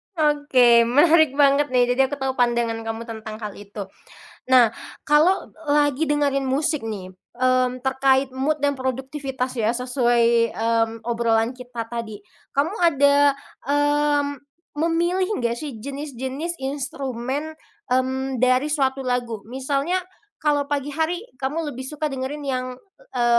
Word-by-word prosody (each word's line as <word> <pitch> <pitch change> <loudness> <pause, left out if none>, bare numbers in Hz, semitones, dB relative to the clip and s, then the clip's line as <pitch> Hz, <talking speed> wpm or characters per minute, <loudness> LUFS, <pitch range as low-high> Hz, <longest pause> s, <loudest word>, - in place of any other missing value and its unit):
Oke, 275 -7 +4
menarik 310 +2 +5
banget 285 0 +4
nih, 245 -1 +3
jadi 265 +1 +3
aku - - -3
tahu 265 -1 -1
pandangan 235 -2 +1
kamu 225 +1 -4
tentang 220 -2 -7
hal 210 -2 -5
itu. 205 0 -8 0.7
Nah, 240 -3 +6 0.3
kalau 310 +6 +3 0.2
lagi 290 0 +2
dengerin 285 -2 +1
musik 295 +2 0
nih, 195 -4 -6 0.2
mmm, 255 0 +2
terkait 265 0 +2
mood 295 +4 0
dan 285 0 +1
produktivitas 260 0 -3
ya, 220 -2 +1
sesuai, 240 -2 +2
mmm, 225 0 +1
obrolan 230 0 +1
kita 245 -2 -6
tadi. 225 -3 -6 0.4
Kamu 305 +8 +1
ada, 285 -3 +5 0.4
mmm, 290 0 +2 0.5
memilih 340 +4 +1
nggak 235 -1 0
sih, 275 -3 -6
jenis-jenis 280 +4 -5
instrumen, 270 +1 -4 0.4
mmm, 260 +1 0
dari 255 +3 +3
suatu 270 -3 0
lagu, 245 -3 -1
misalnya 275 +8 -1 0.3
kalau 290 -2 0
pagi 290 0 -2
hari 325 +5 -1 0.2
kamu 295 +3 -2
lebih 255 - -7
suka 300 +2 -4
dengerin 270 +3 -4
yang, 255 -2 -2 0.5
e 245 - +1
265 Hz, 130 wpm, -23 LUFS, 240-290 Hz, 0.7 s, Nah